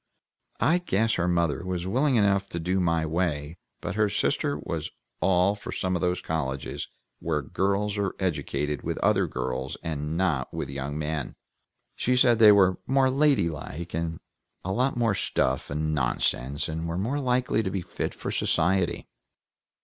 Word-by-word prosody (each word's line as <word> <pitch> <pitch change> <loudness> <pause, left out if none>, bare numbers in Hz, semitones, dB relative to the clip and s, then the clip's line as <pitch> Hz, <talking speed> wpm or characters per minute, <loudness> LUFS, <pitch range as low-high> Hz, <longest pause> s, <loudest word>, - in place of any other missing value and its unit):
I 160 +11 +3
guess 115 - +1
her 90 0 0
mother 85 -5 +1
was 90 -1 -3
willing 130 +8 +2
enough 100 -2 +2
to 85 - -4
do 90 +3 0
my 85 -2 +1
way, 80 -1 -1 0.2
but - - -3
her 105 +1 +2
sister 70 -6 0
was 80 +2 -4 0.3
all 95 +1 +3
for 105 - -8
some 95 -1 -1
of 90 - -1
those 90 0 0
colleges 70 -4 -3 0.3
where 75 -3 -1
girls 100 +6 0
are 100 -1 -1
educated 75 -5 -2
with - - -3
other - - +3
girls 65 0 -3
and 80 -1 -3
not 80 -8 0
with 70 - -4
young 70 +2 -4
men. 75 -2 -3 0.6
She 125 - +1
said 120 -2 +5
they 110 -2 +9
were 95 -3 +4
more 135 0 +3
ladylike, 85 - 0
and 80 0 -2 0.5
a 95 - -1
lot 125 +5 +1
more 115 -3 +2
stuff 65 -8 0
and 75 +1 -1
nonsense, 65 +1 0
and 80 +1 -3
were 85 +1 -3
more 120 +10 -1
likely 125 -3 +1
to 100 - -2
be 95 -1 -3
fit - - -4
for - - -4
society. 90 0 +1
90 Hz, 165 wpm, -27 LUFS, 75-105 Hz, 0.6 s, they